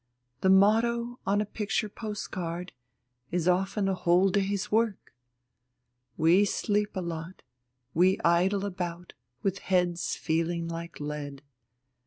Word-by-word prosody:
The 190 - +2
motto 235 +5 +3
on 205 +2 +3
a - - -1
picture 210 +1 -2
postcard 185 -5 -5 0.6
is 175 0 -1
often 195 +2 +1
a 195 - +1
whole 180 +1 +3
day's 200 0 -1
work. 220 - 0 1.0
We 170 +5 +5
sleep 205 +1 0
a 185 - -1
lot, 170 +1 -6 0.5
we 185 +3 +3
idle 185 +4 +3
about 180 -2 -5 0.3
with 195 0 0
heads 180 -2 0
feeling 165 +1 -1
like 170 0 -6
lead. 145 -1 -5
185 Hz, 120 wpm, -28 LUFS, 170-205 Hz, 1.0 s, We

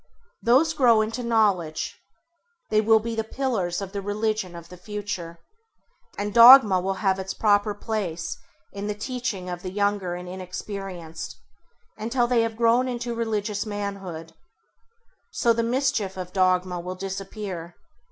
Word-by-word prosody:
Those 275 +7 +4
grow 240 -7 +5
into 225 +3 -2
knowledge; 205 -9 0 0.7
they 215 0 +4
will 220 +1 +5
be 230 +1 -3
the 225 0 -1
pillars 220 -8 -2
of 190 - -7
the 200 -1 -4
religion 205 -2 -2
of 170 0 -10
the 180 - -10
future: 195 -3 -6 0.8
and 205 0 -3
dogma 235 -5 +9
will 195 +1 -1
have 190 0 +3
its 190 0 -4
proper 205 -1 +2
place 195 -7 -3 0.4
in 200 +1 -5
the 210 - -2
teaching 225 -4 -4
of 175 -1 -5
the 185 - -5
younger 200 -2 -1
and 180 0 -7
inexperienced, 185 -2 -7 0.6
until 240 +3 +1
they 240 -1 +2
have 225 -1 -2
grown 235 +2 +3
into 240 -1 -3
religious 215 -3 -2
manhood. 195 -6 -5 1.0
So 235 - +3
the 230 - 0
mischief 235 -5 0
of 180 -1 -6
dogma 185 -1 +2
will 180 +2 -5
disappear. 190 -2 -6
205 Hz, 145 wpm, -25 LUFS, 185-230 Hz, 1.0 s, dogma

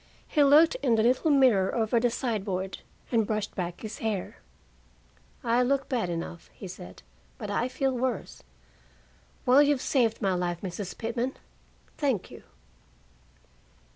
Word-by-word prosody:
He 295 - +3
looked 300 +4 +6
in 250 -5 +3
the 220 - +2
little 255 +7 +3
mirror 255 -10 +4
over 230 0 +2
the 245 +1 +2
sideboard, 195 -6 -3 0.3
and 225 -4 +2
brushed 215 -1 -2
back 175 -2 -4
his 220 -1 -7
hair. 215 -4 -3 1.1
"I 235 +1 +3
look 270 +2 +1
bad 235 -8 0
enough," 170 0 -5
he 195 - -9
said, 90 - -10 0.3
"but 205 - -5
I 235 +4 0
feel 265 +1 -1
worse. 245 -4 -3 1.0
Well, 255 +3 +7
you've 290 -2 +3
saved 240 -4 +1
my 195 -2 +1
life, 175 -1 -2
Mrs. 190 0 -5
Pitman. 235 +3 -2 0.6
Thank 270 - 0
you." - - -11
230 Hz, 140 wpm, -28 LUFS, 195-260 Hz, 1.1 s, Well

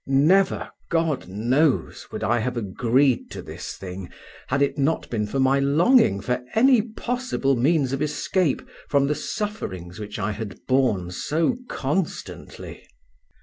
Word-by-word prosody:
Never, 155 +9 +3 0.2
God 165 - 0
knows, 125 - 0
would - - -5
I 120 - +2
have 120 +2 -2
agreed 120 +5 +1
to - - -7
this - - -7
thing 90 -1 -7 0.4
had 140 +2 +2
it 140 - 0
not 145 +3 0
been 105 -3 -1
for 135 +6 -2
my 135 +1 +4
longing 145 - +4
for 125 +2 -2
any 250 +1 +6
possible 235 - -1
means 135 +1 +2
of 135 - -2
escape 150 +1 0 0.3
from 140 -1 +3
the 145 - +1
sufferings 95 - -5
which 105 0 -6
I 105 +1 -1
had 100 -2 -6
borne 125 -10 +1
so 160 - 0
constantly. 155 +6 -4
135 Hz, 145 wpm, -24 LUFS, 110-160 Hz, 0.4 s, any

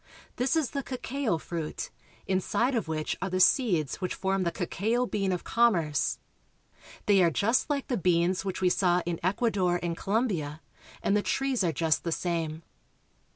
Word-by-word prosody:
This 255 +5 +1
is 310 -7 +1
the 280 - -2
cacao 255 -5 -2
fruit, 160 -1 -5 0.3
inside 195 +7 +1
of 230 -8 -1
which 155 -1 -2
are 195 - -1
the 185 0 -1
seeds 185 - +3
which 185 - -2
form 190 0 0
the 170 -2 0
cacao 215 +8 -1
bean 195 -5 -1
of 180 - -2
commerce. 175 -12 +2 0.9
They 200 -2 +5
are 170 - +5
just 220 - +1
like 285 -2 -1
the 250 - 0
beans 180 +1 +2
which 190 -1 -4
we 185 - +4
saw 180 -1 +2
in 170 -1 -2
Ecuador 185 -2 +1
and 170 -1 -1
Colombia, 180 - -1 0.4
and 200 - +2
the 210 - +3
trees 270 -1 0
are 170 - +2
just 160 +1 +1
the 170 - -2
same. 165 -2 -2
185 Hz, 170 wpm, -28 LUFS, 170-230 Hz, 0.9 s, They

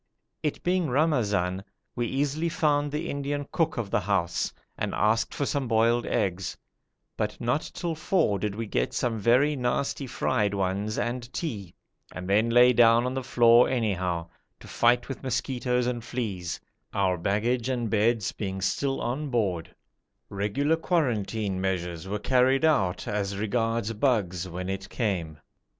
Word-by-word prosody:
It 150 - -2
being 180 -3 +1
Ramazan, 105 - +1 0.3
we 120 -1 -1
easily 145 +6 0
found 145 -4 +1
the 155 +3 -3
Indian 140 0 -3
cook 165 -3 0
of 110 -4 -3
the 120 - +3
house, 90 -4 0 0.2
and - - -3
asked 110 +2 +2
for 140 - -2
some 140 -2 -1
boiled 115 +1 +2
eggs, 95 -1 -1 0.6
but - - -3
not 120 +6 -1
till 170 -2 -2
four 160 - +1
did 105 0 -2
we 115 +1 -3
get 105 - -1
some 115 -3 0
very 130 +8 +3
nasty 135 +2 -1
fried 105 -5 0
ones 100 +3 -1
and 120 0 -3
tea, 105 - -5 0.4
and 90 +2 -7
then 105 +4 +3
lay 120 +1 +6
down 115 0 +5
on 125 - -1
the 130 - -2
floor 120 -1 +5
anyhow, 95 -8 -1 0.3
to - - -13
fight 120 +1 +2
with 135 - -6
mosquitoes 125 -1 -1
and 120 -2 -2
fleas, 100 -9 -4 0.4
our 95 -2 +2
baggage 115 +8 0
and 120 -4 -1
beds 110 0 +2
being 95 -2 -4
still 135 +8 0
on 140 +5 -2
board; 95 -9 -1 0.5
regular 120 +11 0
quarantine 110 - 0
measures 90 -2 -2
were 100 +2 -2
carried 130 +6 +3
out 100 - +1
as 100 -1 -2
regards 115 +1 0
bugs 100 -7 0
when 90 +2 -5
it 95 0 -4
came. 90 -9 -2
115 Hz, 155 wpm, -27 LUFS, 100-130 Hz, 0.6 s, lay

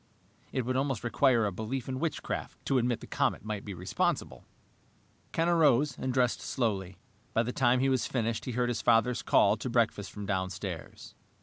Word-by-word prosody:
It 130 - -1
would 130 +1 -1
almost 135 -3 -1
require 120 -1 +3
a 100 - 0
belief 110 +7 -4
in 130 -1 -3
witchcraft 165 -1 -3
to 135 - +2
admit 120 -1 0
the - - -8
comet - - -1
might 105 -2 -4
be 100 -3 -6
responsible! 90 +2 -2 0.8
Ken 165 +1 +1
arose 150 -5 +4
and 130 - -3
dressed 125 -1 +1
slowly. 105 -8 -2 0.4
By 115 - +4
the 125 +2 -3
time 125 -1 +3
he 135 - +3
was 130 -2 +1
finished 115 -3 -1
he 125 - -3
heard 120 +1 +1
his 120 - -1
father's 120 +1 +3
call - - +4
to - - -4
breakfast - - +1
from 105 - -7
downstairs. 95 -2 -4
120 Hz, 185 wpm, -30 LUFS, 105-130 Hz, 0.8 s, arose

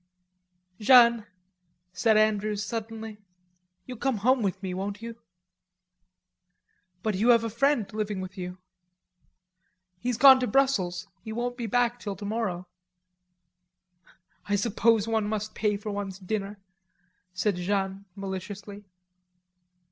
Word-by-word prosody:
"Jeanne," 235 -1 +6 0.7
said 220 -2 +3
Andrews, 215 -1 +1
suddenly, 225 -1 -6 0.7
"you'll 250 -3 -8
come 265 -3 0
home 250 +5 +2
with 195 -1 -2
me, 185 -1 -3
won't 200 +3 -5
you?" 230 0 -8 1.8
"But 215 - 0
you 210 +6 +1
have 230 -1 +6
a 230 - -3
friend 245 0 +2
living 210 -2 -2
with 185 0 -7
you." 180 -1 -6 1.4
"He's 245 +1 -2
gone 265 -2 +9
to 250 - -1
Brussels. 205 -8 +1 0.2
He 220 - -7
won't 240 +2 -3
be 240 -2 -4
back 245 +2 +1
till 205 -4 -5
tomorrow." 205 -4 -3 1.8
"I 205 - +3
suppose 225 +1 +2
one 220 -2 0
must 215 0 -3
pay 210 -2 0
for 210 +1 -6
one's 200 -2 -4
dinner," 200 +1 -4 0.7
said 185 +1 -1
Jeanne 195 +1 -2
maliciously. 200 +1 -7
215 Hz, 120 wpm, -27 LUFS, 200-230 Hz, 1.8 s, gone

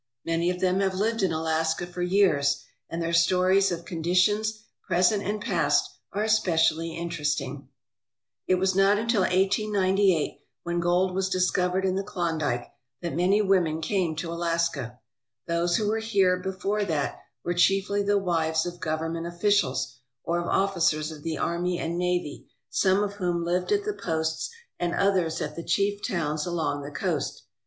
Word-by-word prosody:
Many 165 +1 +1
of 180 0 -2
them 185 0 +2
have 190 -1 +1
lived 225 +3 0
in 190 -3 +2
Alaska 160 +1 0
for 175 0 -7
years 150 -7 +2 0.3
and 165 - -4
their 170 0 -2
stories 185 +3 +4
of 170 -1 -4
conditions, 205 +6 +1 0.2
present 185 +3 +3
and 205 +2 -2
past, 165 -7 +1 0.2
are 205 +2 -1
especially 165 -6 +2
interesting. 150 -4 -3 0.8
It 185 - +4
was 190 +1 +1
not 195 +2 +4
until 225 -1 +1
1898, 190 -2 +2 0.2
when 170 0 -1
gold 175 +2 +2
was 190 0 0
discovered 185 0 +1
in 185 - +1
the 195 +1 -1
Klondike, 160 -10 -2 0.3
that 170 - -2
many 190 +5 +3
women 180 -5 +2
came 175 -2 0
to 165 +1 -4
Alaska. 165 -7 -1 0.5
Those 170 +1 +1
who 210 - -1
were 220 +1 +1
here 200 -5 +2
before 190 +2 -2
that 155 -7 -2 0.2
were 175 - -1
chiefly 195 +3 +2
the 205 0 +2
wives 165 -3 0
of 175 0 -6
govern 160 0 -2
ment 165 0 -4
officials 170 -8 0 0.3
or 170 +1 0
of 175 - -3
officers 165 -5 +1
of 155 -2 -10
the 160 0 -3
army 175 +1 -1
and 170 +1 -3
navy, 180 -4 -2 0.2
some 190 +1 +3
of 205 -1 -3
whom 175 -3 -1
lived 180 +1 -1
at 410 0 +2
the 420 0 -2
posts 160 - -2 0.3
and 175 0 -1
others 185 -5 +1
at - - -5
the 170 - -5
chief 200 +2 0
towns 155 -6 -2
along 155 -5 -1
the 145 - -6
coast. 145 - -3
175 Hz, 165 wpm, -26 LUFS, 165-195 Hz, 0.8 s, stories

